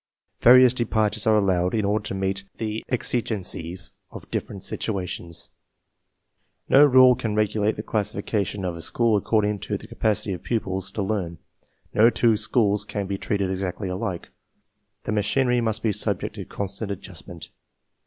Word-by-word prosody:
Various 125 0 +7
de 125 - 0
partures 110 -1 0
are 110 - +5
allowed 95 -2 +2
in 105 -2 +1
order 105 +1 0
to 95 - -3
meet 95 0 -2
the 110 0 -3
exigencies 100 -8 -2 0.2
of - - -12
different 95 - -4
situations. 90 -5 -3 1.2
No 140 - +7
rule 130 -3 +7
can 110 -3 -3
regulate 105 0 +1
the - - -5
classifica 105 0 -1
tion 95 0 -4
of 90 -2 -2
a 85 - -8
school 115 +4 +2
according 105 0 +1
to - - -3
the - - -12
capacity 105 -2 0
of 90 - -6
pupils 95 -5 -2
to 105 - -2
learn; 95 -5 -2 0.6
no 110 +2 +6
two 115 -2 +3
schools 105 -1 +1
can 100 -1 -4
be 95 0 -4
treated 100 -2 -1
exactly 95 0 -3
alike; 90 -1 -4 0.7
the - - -3
machinery 120 +4 +1
must 110 -2 -1
be 110 - +2
subject - - -2
to - - -7
constant 100 +1 -5
adjustment. 90 -3 -8
105 Hz, 160 wpm, -24 LUFS, 95-110 Hz, 1.2 s, Various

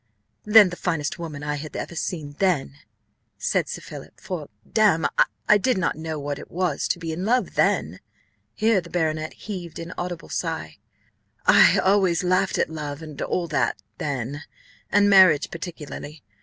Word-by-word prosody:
"Than 210 -2 +8
the - - -5
finest 165 -4 -2
woman 150 -4 -6
I 150 0 -2
had 150 +1 -8
ever 170 - -5
seen 155 -4 -4
then," 155 -7 0 0.6
said - - 0
Sir - - -5
Philip; - - -11
"for, 165 -6 -6 0.2
damme, 205 -8 +3 0.4
I 210 - +6
did 255 +1 +1
not 185 -3 0
know 160 0 -5
what 145 0 -4
it - - -11
was 180 +1 -1
to - - 0
be 165 -2 -5
in 165 +3 -4
love 245 +5 +1
then" - - +1 0.6
(here 220 -3 +3
the 170 - -13
baronet 155 -2 -1
heaved 180 -6 -7
an 170 +1 -7
audible 175 -1 -5
sigh): 160 - -4 0.7
"I - - +7
always 190 -2 +3
laughed 185 +1 +1
at - - 0
love, 150 -1 -5
and 150 -3 -8
all 175 -2 -1
that, 150 - 0 0.2
then, 140 0 -3 0.5
and 205 0 +5
marriage 185 -7 +6
particularly. 155 -3 -8
165 Hz, 165 wpm, -24 LUFS, 150-185 Hz, 0.7 s, Than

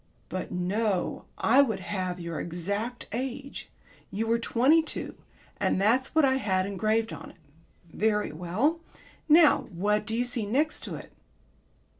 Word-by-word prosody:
But 185 +1 -4
no, 185 +2 -1
I 260 +5 +5
would 225 -8 0
have 185 -2 -3
your 170 -1 -4
exact 200 +8 -4
age. 265 +3 -5 0.4
You 215 +3 -2
were 230 +1 +2
twenty 260 +8 +4
two 320 - -5 0.5
and - - +1
that's 240 +9 +2
what 315 -2 +6
I 265 0 +3
had 190 -7 0
engraved 215 +3 0
on - - -9
it. - - -16 0.6
Very 210 -3 +1
well. 185 - 0 0.5
Now 305 -2 +6
what 210 +4 0
do 225 - -1
you 245 - +1
see 240 -4 -2
next 290 +8 +1
to - - -5
it?" - - -10
220 Hz, 150 wpm, -28 LUFS, 190-260 Hz, 0.6 s, what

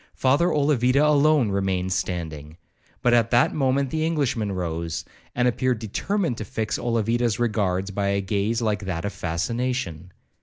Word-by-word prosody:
Father 140 +6 +3
Olavida 140 -1 +3
alone 150 -5 +4
remained 95 -1 0
standing; 80 -4 -4 0.5
but 120 - +4
at 115 -1 +3
that 120 +1 +3
moment 135 -1 +1
the 155 0 -1
Englishman 140 -10 0
rose, 85 -3 -3 0.3
and 125 0 +2
appeared 125 +1 +1
determined 125 - -2
to - - -3
fix 110 +1 -3
Olavida's 115 -1 0
regards 100 -5 0
by 100 0 -1
a 100 0 +1
gaze 105 +4 -1
like 105 -3 -1
that 90 -1 -3
of 100 - -3
fascination. 90 - -3
110 Hz, 150 wpm, -24 LUFS, 95-130 Hz, 0.5 s, alone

